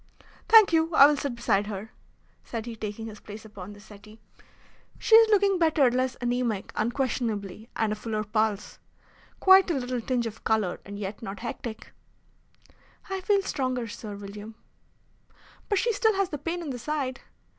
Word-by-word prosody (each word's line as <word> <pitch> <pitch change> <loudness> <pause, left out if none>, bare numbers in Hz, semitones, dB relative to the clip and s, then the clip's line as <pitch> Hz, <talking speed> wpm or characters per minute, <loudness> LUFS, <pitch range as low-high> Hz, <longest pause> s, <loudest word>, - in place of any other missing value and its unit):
"Thank 440 -6 +8
you, 325 0 +2
I 280 - +10
will 295 +1 +4
sit 280 -3 -3
beside 205 -3 +1
her," 210 +1 -6 0.5
said 230 -2 -5
he, 235 -1 -6
taking 215 0 -6
his 215 -2 -9
place 215 +1 -10
upon 205 -2 -10
the 205 - -14
settee. 215 +1 -15 0.8
"She - - -1
is 450 0 +9
looking 400 -3 +3
better, 310 -6 +4
less 255 +1 -1
anaemic 240 -4 -1
unquestionably, 225 -3 -2
and 220 -1 0
a - - -3
fuller 215 0 -3
pulse. 215 0 -1 0.6
Quite 380 0 +7
a 335 - +1
little 250 -2 -2
tinge 245 0 -1
of 225 -1 -7
colour, 215 -5 0
and 200 0 -8
yet 205 0 -6
not 200 -2 -7
hectic." 230 -1 -6 1.2
"I 385 0 -2
feel 395 +1 +2
stronger, 255 -7 -2
Sir 210 -1 -7
William." 205 +2 -9 1.1
"But 410 - +2
she 470 +3 +1
still 440 0 +2
has 390 -1 0
the 295 - -5
pain 340 +4 -3
in 295 - -4
the 245 - -5
side." 270 0 -3
235 Hz, 170 wpm, -27 LUFS, 215-300 Hz, 1.2 s, I